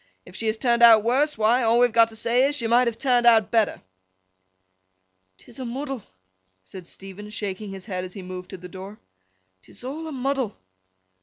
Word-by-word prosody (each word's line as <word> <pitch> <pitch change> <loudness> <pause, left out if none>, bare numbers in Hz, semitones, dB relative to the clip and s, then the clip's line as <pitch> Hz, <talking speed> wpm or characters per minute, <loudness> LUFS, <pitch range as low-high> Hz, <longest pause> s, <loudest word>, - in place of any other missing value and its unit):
If 180 - -14
she 225 - -3
has 220 0 0
turned 235 -1 +1
out 225 -2 +8
worse—why, 245 -2 +2
all 230 0 +3
we 245 - +6
have 240 - -3
got 230 0 +5
to 225 - -13
say 235 +4 +2
is, 290 - -2
she 235 - -2
might 240 +2 +3
have 230 -1 -2
turned 245 -3 +2
out 220 -3 +5
better.' 225 -3 +1 1.5
''Tis 240 - -14
a - - -4
muddle,' 270 +1 -5 0.6
said 175 - -11
Stephen, 195 +3 -10
shaking 205 -1 -5
his 195 -1 -9
head 185 -4 -4
as 185 0 -9
he 195 - -8
moved 180 0 -8
to 190 - -8
the 180 0 -10
door. 190 +3 -10 0.6
''Tis - - -12
a' 255 - -4
a 315 +2 -7
muddle! 265 -4 -2
230 Hz, 200 wpm, -24 LUFS, 195-245 Hz, 1.5 s, out